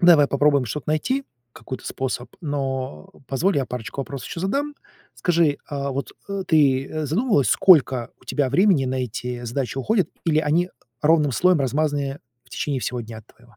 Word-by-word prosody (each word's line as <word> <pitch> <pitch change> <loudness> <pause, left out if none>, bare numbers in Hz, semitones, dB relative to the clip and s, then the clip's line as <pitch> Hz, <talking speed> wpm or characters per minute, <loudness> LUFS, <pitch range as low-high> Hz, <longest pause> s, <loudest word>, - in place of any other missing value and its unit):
давай 170 -5 +7
попробуем 140 -1 +3
что-то 140 +6 -5
найти, 255 - 0 0.3
какой-то 130 - -8
способ, 130 -2 -4
но, 135 - -3
а, - - -20
позволь, 165 +7 +1
я 135 - +1
парочку 125 +2 -5
вопросов 135 -1 -6
еще 165 - -5
задам. 280 +10 -1 0.4
Скажи, 165 -4 +2
а 140 -1 -3
вот, 135 +1 -4 0.2
э, 200 -1 -3
ты 145 0 +2
задумывалась, 165 - +2
сколько 130 - +5
у - - -21
тебя 145 -3 0
времени 170 0 +4
на 130 - -2
эти 125 +1 -5
задачи 125 +2 -3
уходит, 195 - +1 0.2
или 155 -2 +3
они 160 +4 +1 0.3
ровным 150 -2 +4
слоем 180 +4 +3
размазаны 140 0 -1 0.2
в - - -26
течение 140 -4 -2
всего 125 +1 -2
дня 110 -1 -9
твоего? 120 +2 -23
145 Hz, 170 wpm, -23 LUFS, 130-165 Hz, 0.4 s, давай